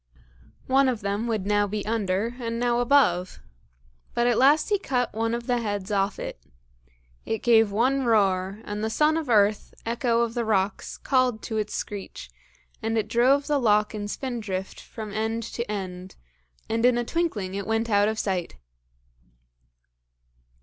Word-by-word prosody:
One 265 0 +3
of 235 -4 -2
them 200 +3 -2
would 215 -5 -1
now 205 0 +2
be 210 0 -4
under, 215 +1 -1
and 230 -1 -3
now 240 0 +1
above. 240 -9 +2 0.8
But 240 - +2
at 240 -2 +2
last 290 +7 +4
he 410 -2 +2
cut 250 -8 -1
one 225 +2 -1
of 235 0 -5
the 245 0 +1
heads 205 -2 -3
off 200 0 0
it. - - -6 0.8
It 225 - -3
gave 225 -3 +5
one 260 +6 +1
roar, 195 -2 +1
and 210 0 -5
the 220 - 0
son 300 +7 +2
of 320 -5 -3
earth, 210 -2 +2
echo 235 0 +1
of 235 -1 -1
the 240 -1 -1
rocks, 200 -3 -1
called 255 -4 +1
to 220 - -3
its 210 -1 -2
screech, 200 -2 -6 0.5
and 225 0 -1
it 215 -1 0
drove 260 +5 +3
the 295 -1 +1
loch 210 -3 +2
in 205 -1 -4
spindrift 210 -6 -4
from 215 -2 -8
end 220 +2 -2
to 235 0 -5
end, 185 -2 -6 0.5
and 225 +1 -1
in 245 -1 +4
a 240 - -1
twinkling 230 - -2
it 200 -1 -4
went 225 +1 0
out 205 -2 +3
of 220 0 -1
sight. 185 - -2
225 Hz, 170 wpm, -25 LUFS, 205-240 Hz, 0.8 s, gave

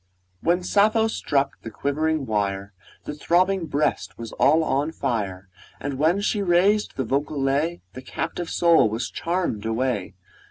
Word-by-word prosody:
1 170 - +2
When 180 - -10
Sappho 215 +4 +3
struck 140 -10 -1
the 115 - -7
quivering 150 +5 -1
wire, 100 -2 -2 0.3
The - - -5
throbbing 175 +4 +1
breast 150 +1 -1
was 115 -1 -7
all 160 +3 +3
on 145 +1 0
fire; 100 - -3 0.3
And 140 -2 -4
when 165 +6 +3
she 210 0 0
raised 195 +3 +2
the 135 - -1
vocal 140 +4 -1
lay, 145 +5 0
The 130 - -8
captive 165 +5 -4
soul 170 -9 +4
was 115 +3 -3
charm'd 170 - -2
away! 115 -2 -1
145 Hz, 155 wpm, -24 LUFS, 120-175 Hz, 0.3 s, soul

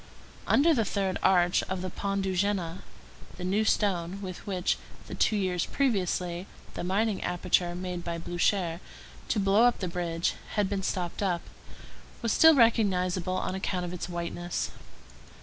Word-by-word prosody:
Under 320 +4 +5
the 235 -6 +2
third 195 -2 -1
arch 175 -2 +4
of 185 -1 -3
the 185 - -4
Pont 200 -1 -2
de 190 - -1
Jéna, 185 -2 0 0.6
the 180 - -6
new 195 +4 +1
stone 195 -4 0
with 185 -1 -7
which, 185 -2 0 0.3
the - - -8
two 215 - +2
years 185 -4 0
previously, 185 -7 0 0.3
the - - -5
mining 200 +3 0
aperture 175 0 +1
made 180 -1 -4
by 170 -1 -3
Blücher 175 0 0 0.5
to 215 - +1
blow 200 +4 +4
up 245 - +3
the 185 - -3
bridge 170 -1 -1 0.2
had 205 -2 +2
been 200 0 -2
stopped 180 -1 -3
up, 180 -4 0 0.8
was 230 - +1
still 320 -1 +7
recognizable 185 -7 +2
on - - -2
account 185 -1 -2
of 175 - -5
its 180 0 -5
whiteness. 175 0 -3
185 Hz, 160 wpm, -28 LUFS, 175-200 Hz, 0.8 s, still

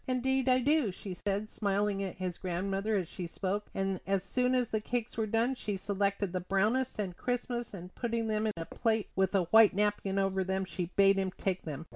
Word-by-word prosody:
"Indeed 260 +1 +1
I 255 - +6
do," 285 -4 +3
said 195 +2 -3
she, - - -17
smiling 200 -1 0
at 190 -2 -3
his 180 -2 -4
grandmother 195 +4 -1
as 180 -4 -1
she 175 +1 -6
spoke; 195 +4 -2
and 195 -1 -1
as 195 -1 +1
soon 250 +6 +1
as 250 -2 +1
the 215 - -1
cakes 240 +1 -3
were 220 -1 0
done 230 +4 +2
she 210 -6 -3
selected 200 -1 -1
the 185 - 0
brownest 215 +8 +1
and 190 -4 -3
crispest, 240 -1 -3
and 180 0 -9
putting 230 -1 -1
them 215 0 0
in 215 - 0
a 165 - -4
plate 220 +1 0
with 190 +1 +2
a 190 - +4
white 225 -3 +7
napkin 205 -1 0
over 195 -1 +1
them, 190 +1 -1
she 180 -1 -3
bade 195 0 +5
him 190 -1 0
take 190 -1 -2
them. 155 0 -5
200 Hz, 215 wpm, -31 LUFS, 190-225 Hz, -, white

